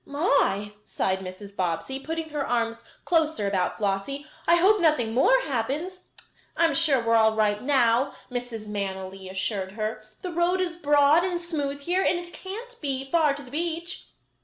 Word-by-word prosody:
"My!" 210 - +1
sighed 190 -2 -1
Mrs. 190 +2 -9
Bobbsey, 180 +8 -2
putting 320 +2 -4
her 295 -2 -2
arms 235 -2 -1 0.2
closer 315 -9 +1
about 190 -2 0
Flossie, 210 +8 -2 0.2
"I 340 - +6
hope 385 +4 +4
nothing 300 -9 +2
more - - +5
happens." 300 - -3 0.5
"I 335 - +4
am 325 - +2
sure 285 -3 +4
we 230 - -2
are 230 - +5
all 220 -1 +4
right 210 -1 +1
now," 255 -1 +3 0.2
Mrs. 245 -3 -5
Manily 190 -2 -5
assured 190 0 -2
her. 215 0 -3 0.2
"The 360 -2 -4
road 345 +2 +2
is 355 -2 -1
broad 295 0 +4
and 360 -2 -1
smooth 290 -5 -3
here, 355 +6 +1
and 360 - +2
it 345 0 -8
can't 465 +6 -9
be 270 -2 -3
far 310 -4 +3
to 285 - -8
the 250 - -14
beach." 340 +3 -4
275 Hz, 175 wpm, -26 LUFS, 215-335 Hz, 0.5 s, I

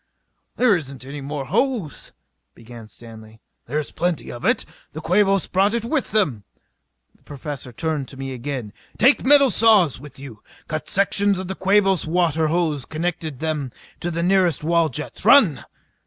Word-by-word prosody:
"There 245 -5 +4
isn't 140 -6 -6
any 140 +1 -7
more 140 0 -5
hose 225 - -2 0.2
" - - -53
began 115 -1 -12
Stanley. 110 -1 -14 0.3
"There's 150 0 -3
plenty 175 -3 -2
of 120 - -9
it. - - +1 0.3
The 155 - -6
Quabos 195 +3 +2
brought 200 +4 +1
it 230 -1 -2
with 275 +3 -1
them." 150 - 0 0.7
The - - -32
Professor 145 -3 -7
turned 155 0 -3
to 135 - -12
me 135 0 -5
again. 125 -4 -6 0.2
"Take 260 +6 +4
metal 280 -1 +5
saws 205 - +4
with 145 -1 -13
you. 130 -6 -11 0.3
Cut 155 0 -5
sections 200 0 +2
of 185 0 -5
the 190 - -3
Quabos 195 -2 +2
water 165 -2 +1
hose 160 -3 0
and - - -15
connect 175 +2 -3 0.2
them 150 -3 -3 0.3
to 175 - -3
the 170 0 -2
nearest 180 -4 +2
wall 165 0 +2
jets. 125 - -6
Run!" - - +5
160 Hz, 170 wpm, -21 LUFS, 135-195 Hz, 0.7 s, metal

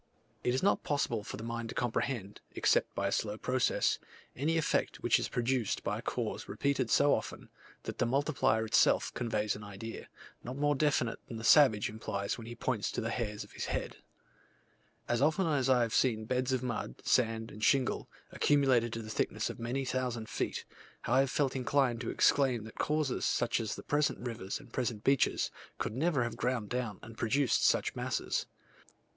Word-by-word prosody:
It 125 - +1
is 130 - -1
not 200 - +3
possible 120 -7 0
for - - -6
the 110 - -7
mind 115 0 -4
to - - -7
comprehend, 115 -3 -2
except - - +2
by 100 - -1
a - - -1
slow 105 0 -1
process, 125 +2 +1 0.4
any 155 +5 +1
effect 160 - 0
which - - +4
is - - -2
produced 125 -2 0
by - - -1
a - - -6
cause - - -3
repeated 135 -4 0
so 145 0 +5
often, - - -4 0.3
that - - -6
the 120 - +2
multiplier 130 -4 +1
itself 110 - +3
conveys 110 -3 -1
an 105 - -9
idea, 105 +3 -8 0.3
not 125 +3 -6
more 145 +1 +2
definite 135 -5 +1
than 115 - -6
the 110 - -7
savage 115 -5 +6
implies 100 -2 -3
when 115 -2 -9
he 120 - -7
points 120 -5 -1
to - - -2
the 115 - -2
hairs 105 -4 -3
of - - -16
his - - -4
head. - - -3 1.1
As 120 +1 +1
often 160 +6 +3
as 140 -5 +1
I 125 -2 +5
have 115 - -2
seen 110 -4 +2
beds 125 +2 0
of 130 -1 0
mud, 115 - -4
sand, 115 -2 +1
and 105 +1 -9
shingle, 135 0 +2 0.2
accumulated 130 -5 +3
to 115 - -4
the 110 - -7
thickness - - -1
of - - -12
many 125 +4 -2
thousand 125 -3 -2
feet, - - -3 0.4
I 130 +3 +3
have 135 0 +3
felt 140 -1 0
inclined 130 -2 +1
to 120 - -3
exclaim 130 -5 +3
that 110 - -11
causes, 150 -3 0
such 120 - +1
as 110 -2 -2
the - - -9
present 145 0 +1
rivers 115 -6 -4
and 145 -2 -14
the - - -27
present 120 -4 -2
beaches, 135 -1 +2 0.3
could - - -3
never 145 -2 +2
have 120 -1 -4
ground 120 -4 -1
down 120 -5 -2
and 115 0 -10
produced 125 +3 +1
such - - +2
masses. - - -2
120 Hz, 195 wpm, -32 LUFS, 110-135 Hz, 1.1 s, savage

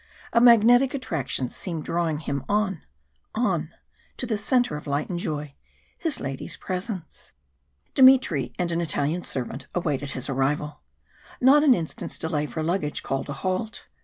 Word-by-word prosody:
A 235 - +5
magnetic 245 +3 +6
attraction 155 - -2
seemed 165 +4 -5
drawing 165 -3 -1
him 140 -3 -3
on 205 -4 0 0.5
on 240 +3 0 0.5
to - - -3
the 225 -2 -1
centre 240 - +1
of 150 - -7
light 145 +5 -1
and 175 - -2
joy 150 -4 -4 0.4
his 320 -7 +1
lady's 135 -1 -5
presence. 185 - -5 0.6
Dmitry 255 - +5
and 175 -1 -1
an 170 0 0
Italian 160 +1 0
servant 130 -7 -5
awaited 145 -5 -1
his 130 - -4
arrival; 145 +2 -1 0.6
not 275 +4 +6
an 275 -5 +6
instant's 165 -5 -4
delay 150 -2 -2
for 160 - -4
luggage 160 -3 -1
called 135 +1 -3
a - - -2
halt. 185 +4 -2
170 Hz, 150 wpm, -25 LUFS, 145-225 Hz, 0.6 s, magnetic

